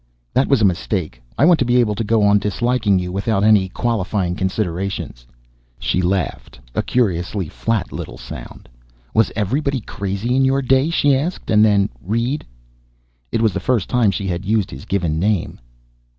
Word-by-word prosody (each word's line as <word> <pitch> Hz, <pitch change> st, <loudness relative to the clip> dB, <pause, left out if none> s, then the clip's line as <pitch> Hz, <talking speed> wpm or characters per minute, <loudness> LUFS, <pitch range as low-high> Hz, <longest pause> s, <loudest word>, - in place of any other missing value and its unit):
"That 130 Hz, -, +2 dB
was 135 Hz, -6 st, +3 dB
a -, -, +6 dB
mistake. 90 Hz, -, -1 dB, 0.2 s
I 140 Hz, -, +4 dB
want 175 Hz, -1 st, +5 dB
to -, -, +3 dB
be 120 Hz, +1 st, +2 dB
able 115 Hz, -4 st, +3 dB
to 110 Hz, +2 st, -2 dB
go 110 Hz, 0 st, +2 dB
on 100 Hz, 0 st, +5 dB
disliking 105 Hz, 0 st, +1 dB
you 90 Hz, -1 st, -2 dB
without 100 Hz, +1 st, 0 dB
any 105 Hz, -3 st, +4 dB
qualifying 100 Hz, -5 st, -1 dB
considerations." 95 Hz, -, -3 dB, 0.5 s
She 90 Hz, -, 0 dB
laughed, 90 Hz, -1 st, -2 dB
a -, -, +1 dB
curiously 95 Hz, -5 st, -1 dB
flat 110 Hz, +2 st, -2 dB
little -, -, -7 dB
sound. -, -, -10 dB, 0.5 s
"Was 110 Hz, -, +3 dB
everybody 135 Hz, +6 st, 0 dB
crazy 100 Hz, +4 st, -3 dB
in 135 Hz, -, +3 dB
your 135 Hz, +1 st, +2 dB
day?" 135 Hz, +4 st, +3 dB
she 145 Hz, -4 st, +3 dB
asked. 160 Hz, +7 st, -3 dB
And 105 Hz, 0 st, +5 dB
then, 100 Hz, -2 st, +4 dB, 0.2 s
"Reed 115 Hz, +9 st, -1 dB, 0.5 s
" -, -, -42 dB
It 115 Hz, -, 0 dB
was 110 Hz, -4 st, +3 dB
the -, -, -2 dB
first 125 Hz, -4 st, 0 dB
time 120 Hz, -4 st, +3 dB
she 100 Hz, +1 st, -2 dB
had 90 Hz, -1 st, -2 dB
used 105 Hz, 0 st, 0 dB
his 65 Hz, +1 st, -9 dB
given 85 Hz, -5 st, -1 dB
name. 100 Hz, -1 st, -1 dB
105 Hz, 180 wpm, -19 LUFS, 95-120 Hz, 0.5 s, a